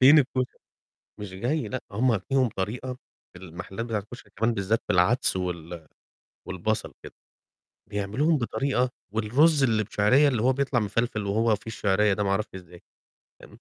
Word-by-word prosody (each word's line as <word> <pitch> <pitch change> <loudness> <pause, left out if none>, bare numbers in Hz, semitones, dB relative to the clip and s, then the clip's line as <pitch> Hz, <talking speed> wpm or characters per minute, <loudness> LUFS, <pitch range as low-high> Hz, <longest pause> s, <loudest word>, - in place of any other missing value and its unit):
فين 145 +4 +8
الكشري؟ 130 -2 0 0.6
مش 100 -3 -7
جاي 130 +10 -1
لأ، 130 - -4
هم 110 -1 +1
ليهم 130 -2 +3
طريقة 120 +6 -4 0.4
المحلات 95 +5 -7
بتاعة 110 -3 -1
الكشري 105 0 -13
كمان 115 +2 +1
بالذّات 105 +3 0
بالعدس 95 +4 +3
وال 85 -2 -5 0.6
والبصل 105 +4 -2
كده. - - -11 0.8
بيعملوهم 110 +11 +1
بطريقة 130 0 0 0.2
والرز 135 +8 +3
اللي 110 -3 +2
بشعرية 125 +8 +4
اللي 125 -6 +1
هو 130 +3 +3
بيطلع 135 -2 +1
مِفلفِل 110 0 -1
وهو 110 +2 +2
فيه 105 - -15
الشعرية 105 -2 +2
ده 105 - -1
ما 100 - 0
أعرفش 100 0 -1
إزاي، 90 -1 -12 0.6
تمام؟ - - -13
110 Hz, 150 wpm, -26 LUFS, 100-130 Hz, 0.8 s, فين